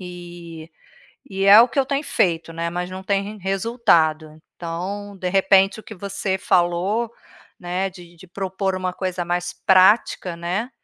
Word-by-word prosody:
Eh, 175 -2 -10 0.6
e 195 0 -2
é 200 +2 +9
o 240 - +4
que 250 - -10
eu 270 - +2
tenho 280 +2 -2
feito, 165 - 0
né, 170 +1 -3
mas 180 +1 -4
não 185 +1 -8
tem 195 0 0
rem 210 +2 -8
resultado. 170 -7 0
Então, 195 +4 -6
de 180 -1 -3
repente, 195 +2 +3
o - - -12
que 220 - -10
você 195 0 -3
falou, 185 +7 +1 0.5
né, 185 +2 -2
de 175 -2 -15
de 170 - -15
propor 190 +1 -3
uma 185 -1 -3
coisa 185 -2 -3
mais 175 +1 -2
prática, 190 -1 +4
né, 185 +8 -3
185 Hz, 165 wpm, -21 LUFS, 175-200 Hz, 0.6 s, é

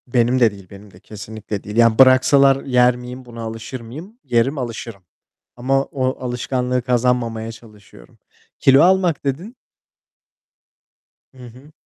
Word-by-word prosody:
Benim 120 +1 +1
de 115 -3 +4
değil, 100 -2 -14
benim 100 0 -14
de. 90 - -18
Kesinlikle 105 0 -8
değil. 105 - -8
Yani, 115 -1 +3
bıraksalar 135 +1 +5
yer 125 -1 +3
miyim, 125 +1 -10
buna 115 -1 -10
alışır 115 +3 -7
mıyım? 160 - -11
Yerim, 125 +3 0
alışırım. 115 -5 -7 0.5
Ama 135 +3 0
o 130 -2 -3
alışkanlığı 125 0 -2
kazanmamaya 120 -2 -1
çalışıyorum. 110 -2 -18 0.4
Kilo 135 +1 +5
almak 180 -4 +2
dedin? 170 - -4 1.8
Hı - - -21
hı. 130 +6 -16
125 Hz, 130 wpm, -19 LUFS, 115-135 Hz, 1.8 s, bıraksalar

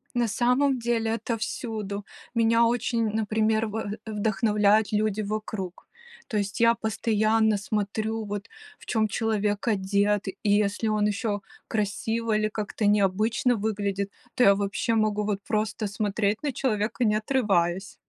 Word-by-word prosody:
На 240 -1 +2
самом 250 +5 +2
деле 230 -2 0
это 230 +1 -2
всюду. 215 -3 -4 0.3
Меня 230 0 +4
очень, 235 -1 +1
например, 220 +1 +1
в 210 -1 -4
вдохновляют 210 0 +2
люди 215 0 +1
вокруг. 210 -3 -5 0.4
То 215 - -2
есть 200 -1 -2
я 230 0 +5
постоянно 220 0 +1
смотрю, 215 +2 -2
вот, 205 0 -5 0.3
в - - -17
чем 220 -2 +1
человек 210 -2 -1
одет, 200 0 +1
и 195 +2 -3
если 205 +2 +1
он 210 -1 +2
еще 210 0 -1 0.3
красиво 220 +2 -1
или 215 0 +1
как-то 210 0 -3
необычно 210 +4 +2
выглядит, 200 -2 -2 0.2
то 250 - +3
я 200 -2 +7
вообще 200 +3 -1
могу 215 -1 +1
вот 205 -1 -1
просто 215 0 -1
смотреть 205 +2 -1
на 290 - 0
человека, 230 -2 -1
не 210 -1 +3
отрываясь. 195 -6 0
215 Hz, 140 wpm, -26 LUFS, 205-225 Hz, 0.4 s, я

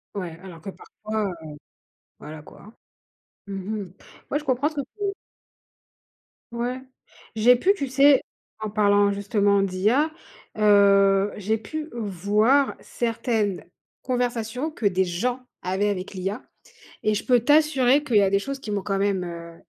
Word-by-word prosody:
Ouais, 175 -4 -5
alors 180 -4 -11
que 195 - -7
parfois, 215 +1 -5
heu, 155 - -8 0.7
voilà, 150 +1 -9
quoi. 210 +8 -15 0.7
Mmh 200 - -7
mh. 195 -1 -5 0.4
Ouais, 290 - +1
je - - -12
comprends 260 +1 +1
ce 315 - -14
que 285 - -1
tu 405 +10 -10 1.5
Ouais. 245 +2 -3 0.6
J'ai 235 +3 +6
pu, 375 +11 +3
tu 280 -8 -3
sais, 275 +1 +5 0.4
en 215 - -4
parlant 205 -1 +3
justement 200 0 +1
d'IA, 210 +11 +1 0.5
heu, 200 -1 +4
j'ai 215 +2 -1
pu 310 +9 -6
voir 215 +6 +1
certaines 225 -4 -2 0.4
conversations 245 +2 -2
que 245 - -6
des 190 -1 +2
gens 240 +9 -2 0.2
avaient 190 +3 0
avec 195 -1 -4
l'IA 195 +5 -4 0.6
et 215 - +2
je 210 - -3
peux 250 -1 +4
t'assurer 290 0 +3
qu'il 245 -7 +1
y - - +6
a 195 - +3
des 200 - +2
choses 275 +6 -5
qui 215 - -7
m'ont 205 -1 -1
quand 195 0 -1
même, 195 -2 0
heu 170 -1 -8
210 Hz, 150 wpm, -24 LUFS, 195-250 Hz, 1.5 s, J'ai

